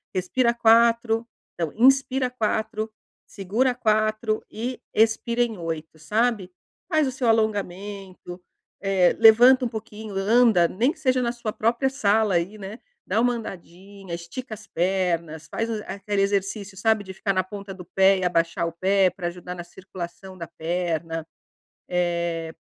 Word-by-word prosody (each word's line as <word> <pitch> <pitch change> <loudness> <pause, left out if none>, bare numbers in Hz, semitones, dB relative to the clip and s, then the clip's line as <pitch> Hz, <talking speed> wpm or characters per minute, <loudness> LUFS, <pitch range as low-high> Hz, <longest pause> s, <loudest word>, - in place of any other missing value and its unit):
respira 235 +7 +1
4 230 0 +3 0.3
não 165 -3 -1
inspira 265 +2 +3
4, 220 -2 -2 0.4
segura 225 +7 0
4 215 0 0
e 240 +3 -5
expira 225 +2 +2
em 225 -3 -4
8, 160 -1 -6
sabe, 210 +1 0 0.4
faz 310 -4 +2
o - - -2
seu 255 -1 -2
alongamento, 200 -4 -2 0.4
eh, 195 -3 +3
levanta 245 +3 +7
pouquinho, 220 -2 -8
anda, 210 -2 +4
nem 235 - +1
que 320 - -14
seja 255 -4 +2
na 235 -1 0
sua 235 -3 -5
própria 235 +4 +1
sala 215 -6 +2
aí, 175 +5 -1
né, 205 +3 -8 0.3
dá 220 - +1
uma 245 0 +2
andadinha, 195 -3 -8
estica 215 +8 -7
as 210 0 -15
pernas, 170 -3 -1
faz 225 +9 -3
a 215 -2 -3
aquele 200 0 -1
exercício 200 0 -2
sabe 220 +1 +2
de 190 -1 -9
ficar 195 +1 -1
na 185 0 +1
ponta 200 +1 -9
do 185 -2 -11
pé 190 +2 +4
e 185 - -1
abaixar 170 -1 +1
o - - -4
pé 190 +2 +3
pra 180 -1 -5
ajudar 180 +1 -7
na 175 - -7
circulação 185 +1 -9
da 170 -2 -7
perna, 165 -1 -3 0.6
eh, 170 -2 -1
205 Hz, 150 wpm, -24 LUFS, 180-230 Hz, 0.6 s, levanta